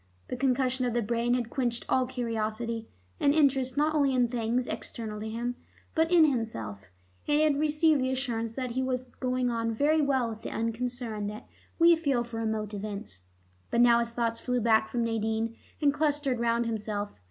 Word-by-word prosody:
The - - -2
concussion 255 0 +1
of 240 -1 -1
the 240 - +1
brain 235 +3 +1
had 240 -2 -2
quenched 240 -3 -1
all 255 -1 +2
curiosity, 230 -2 -3 0.3
and 285 +1 +3
interest 270 -4 +2
not 305 +1 +2
only 280 -3 +2
in 245 -2 +3
things 240 +1 0
external 215 -4 -5
to 220 +1 -4
him, 240 +2 -3 0.4
but 325 +1 +2
in 340 -3 +7
himself, 115 - -2 0.4
and 295 - +3
he - - +3
had 295 -2 +2
received 305 -1 +3
the 260 - +1
assurance 235 -4 -2
that 255 -2 -3
he 260 +2 -1
was 255 -1 -1 0.2
going 255 -1 0
on 230 -1 -1
very 295 +7 +2
well 270 -4 +2
with 220 -1 -7
the - - -5
unconcern 230 -2 -3
that 210 +1 -7 0.3
we 335 0 +7
feel 280 -7 0
for 235 -1 -7
remote 220 -2 -2
events. 200 - -6 0.5
But 235 - +2
now 235 -1 +6
his 235 0 -1
thoughts 230 -1 -1
flew 250 -1 -1
back 220 -1 +3
from 240 -1 -1
Nadine 225 0 -1 0.2
and 285 -2 +3
clustered 290 -4 0
round 235 0 +1
himself. 210 -2 -3
240 Hz, 190 wpm, -29 LUFS, 225-265 Hz, 0.5 s, in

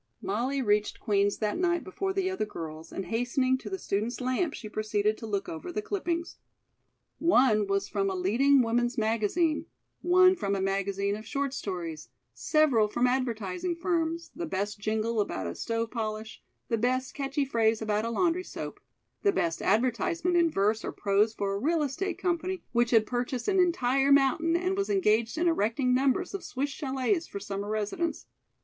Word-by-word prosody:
Molly 255 +7 -1
reached 210 -1 +1
Queen's 200 -1 +1
that 215 +7 -1
night 345 -2 +1
before 385 0 -3
the 380 -1 0
other 375 -10 -1
girls, 160 -4 -8
and 195 - -4
hastening 250 +3 +1
to - - -8
the 385 - -3
student's 220 - -2
lamp, 255 +5 0
she 220 - -8
proceeded 215 0 0
to 225 - -6
look 200 -2 -2
over 165 - -6
the 420 +4 -3
clippings. 345 -5 -3 0.8
One 250 -11 +4
was 195 0 0
from 195 -1 0
a 190 - -2
leading 250 +9 +4
woman's 240 +1 0
magazine; 230 - +1 0.3
one 370 +1 +6
from 200 - -1
a - - -1
magazine 195 +1 0
of 215 +1 -9
short 280 -2 -2
stories; 170 - -5 0.2
several 280 -9 +3
from 240 +4 0
advertising 250 - -1
firms 335 -1 -1
the 340 -1 -4
best 205 -4 -3
jingle 220 +1 0
about 95 - -3
a 85 - -3
stove 230 - -2
polish; 220 -1 -4 0.3
the 230 - 0
best 255 +3 0
catchy 275 0 -1
phrase 225 -4 +2
about 215 -1 0
a 230 - -2
laundry 340 +8 +1
soap; - - -7 0.4
the 405 - +4
best 165 - -1
advertisement 255 - +1
in 340 -1 +4
verse 215 -3 +1
or - - -3
prose 205 +2 +2
for 200 -2 -1
a 200 - -2
real 315 +5 +1
estate 340 +6 -2
company 365 0 -2
which 240 0 +2
had 225 -2 +4
purchased 245 +1 -3
an 385 -1 +3
entire 275 -6 +2
mountain 280 +4 +4
and 365 +2 0
was 395 0 -1
engaged 235 - +2
in 345 +2 +2
erecting 250 -4 +1
numbers 275 +9 +1
of 395 - -4
Swiss 280 +2 -3
chalets 275 +5 -1
for 200 - -6
summer 200 0 -5
residents. 215 +11 -2
245 Hz, 180 wpm, -28 LUFS, 210-330 Hz, 0.8 s, one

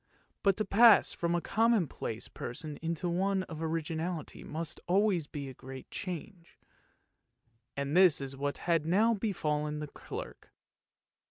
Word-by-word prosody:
But 195 -2 +3
to 215 - 0
pass 225 +3 +6
from 170 0 0
a 175 - 0
commonplace 200 - 0
person 145 +5 -5
into 165 +1 -2
one 190 +2 +1
of 160 -3 -8
originality 160 0 -3
must 160 +1 -5
always 185 -4 +2
be 145 -2 -6
a 130 - -7
great 130 +1 -10
change, 180 -1 -7 1.2
and 140 +2 -1
this 185 -4 +6
is 135 -1 -5
what 140 +1 -2
had 165 -3 +2
now 205 +8 +3
befallen 150 -8 -1
the 150 - -4
clerk. 145 - -9
165 Hz, 140 wpm, -31 LUFS, 150-190 Hz, 1.2 s, pass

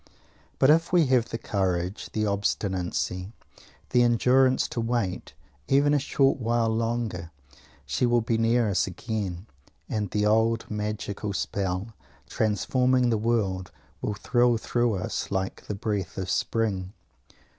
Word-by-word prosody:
But 135 - +5
if 165 +2 +3
we 175 -3 +5
have 120 -2 +3
the 115 - -3
courage, 95 -3 -2
the 110 0 0
obstinacy, 95 -1 -1 0.6
the 125 - +4
endurance, 130 +2 +3
to 120 - -2
wait 115 -6 -2 0.3
even 145 +2 +4
a 145 - +4
short 135 0 +2
while 115 -1 +1
longer 115 -6 -2 0.6
she 70 - 0
will 120 0 +3
be 115 +1 0
near 115 0 +3
us 100 -1 +1
again; 95 -2 -4 0.4
and 105 -3 -2
the 105 +1 0
old 110 +1 +2
magical 105 -1 -3
spell, 95 +3 -2 0.3
transforming 125 +4 +1
the 110 - +2
world, 100 -5 0 0.3
will 105 - -2
thrill 120 +2 +2
through 120 0 0
us 90 - -3
like 95 -1 -3
the 105 - -3
breath 100 -3 -3
of 95 -2 -3
spring! 100 -4 -1
110 Hz, 135 wpm, -26 LUFS, 95-120 Hz, 0.6 s, But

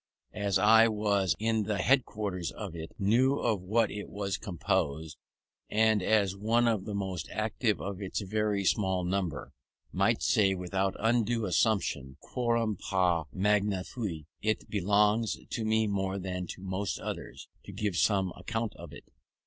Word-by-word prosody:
As 100 -2 +1
I 110 +3 +6
was 105 -3 +1
in 110 -1 0
the 105 -1 -1
headquarters 105 -6 0
of 100 -6 -7
it, 80 0 -7
knew 120 +7 +3
of 110 -5 0
what 110 +4 +1
it 105 -1 -6
was 100 -1 -3
composed, 80 -4 -2 0.5
and 110 -1 +3
as 100 -1 +2
one 115 +4 +2
of 110 -5 0
the 105 - -4
most 95 -3 -3
active 110 -1 0
of 100 0 -5
its 95 - -3
very 105 0 -1
small 95 -2 +1
number, 90 -6 -2 0.4
might - - +2
say 95 -2 +3
without 95 +1 -1
undue 115 0 +1
assumption, 85 - 0
quorum 115 -4 -1
pars 90 -4 +1
magna 100 -1 +1
fui, 90 - -5 0.2
it 110 0 -1
belongs 105 +2 +2
to 115 - -2
me 110 0 +2
more 95 -2 -1
than 90 -1 -4
to 95 - -8
most 95 +1 -2
others, - - -6 0.2
to - - -8
give 100 -1 -2
some 95 -1 +2
account 110 +4 -3
of - - -10
it. - - -11
100 Hz, 155 wpm, -30 LUFS, 95-110 Hz, 0.5 s, I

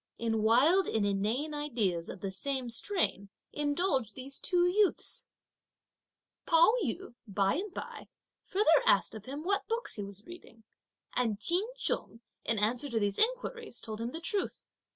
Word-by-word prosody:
In 225 -1 0
wild 280 - +5
and 215 -2 +1
inane 215 +10 -1
ideas 225 - -1
of - - -8
the 195 - -3
same 260 +3 -3
strain, 230 - 0 0.2
indulged 290 - 0
these 270 +1 -5
two 355 -1 +2
youths! 400 +2 +1 1.2
Pao 335 +5 +6
yü 245 -2 -4
by 195 -1 +1
and 395 +3 -4
by - - -7 0.4
further 370 -6 +4
asked 195 - +4
of 215 -2 -9
him 280 +4 -6
what 395 +3 0
books 460 - -2
he 205 - -3
was 200 +1 -10
reading, 285 -10 -13 0.5
and 225 -5 0
Ch'in 350 - +3
Chung, 230 - -2 0.2
in 230 - 0
answer 235 +7 0
to 230 -3 0
these 205 -1 0
inquiries, 470 - 0
told 220 -1 -6
him 230 - -2
the 320 - -5
truth. 390 +3 -2
255 Hz, 155 wpm, -31 LUFS, 215-350 Hz, 1.2 s, Pao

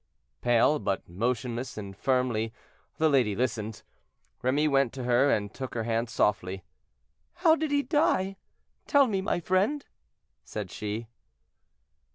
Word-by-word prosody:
Pale, 120 +5 +4
but 95 - -2
motionless 120 +6 -2
and 100 -2 -6
firmly, 125 -2 0 0.5
the 160 - +3
lady 125 -9 +3
listened; 110 -3 -2 0.6
Remy 140 +4 +2
went 135 -4 +2
to 130 - -5
her 125 +3 +3
and 105 -5 0
took 130 -2 -6
her 115 - -1
hand 115 +1 -1
softly. 95 -4 0 0.7
"How 340 -2 +5
did 315 -1 -2
he 285 0 +2
die; 195 - +1 0.5
tell 285 -1 +5
me, 200 -6 -1
my 190 - 0
friend?" 195 - +1 0.6
said 105 -4 -6
she. 105 +2 -4
125 Hz, 135 wpm, -28 LUFS, 110-170 Hz, 0.7 s, How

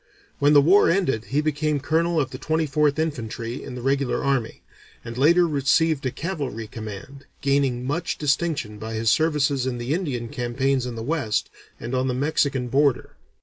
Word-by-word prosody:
When 145 +1 +4
the 145 -1 +7
war 190 +7 +5
ended 165 - +1
he 145 +3 0
became 150 -1 0
colonel 165 +4 +1
of 135 - -1
the - - -7
Twenty 160 0 0
fourth 150 0 +1
Infantry 120 -5 -3
in 130 - -7
the 125 - -7
regular 135 0 0
army, 135 -5 -1 0.4
and 115 - -6
later 170 +7 +4
received 150 +1 +2
a - - -2
cavalry 140 - -4
command, 110 +5 -9
gaining 135 -3 +1
much 165 +6 -2
distinction 145 -7 -1
by 110 +1 -5
his 110 0 +2
services 145 -4 +1
in 125 -2 -2
the 120 +4 -2
Indian 140 -10 -2
campaigns 130 0 -1
in 120 - -5
the 115 - -5
West 120 -7 -1 0.3
and 120 +3 -6
on 130 0 +1
the 125 - -1
Mexican 140 -2 0
border. 135 0 +1
140 Hz, 180 wpm, -24 LUFS, 120-155 Hz, 0.4 s, the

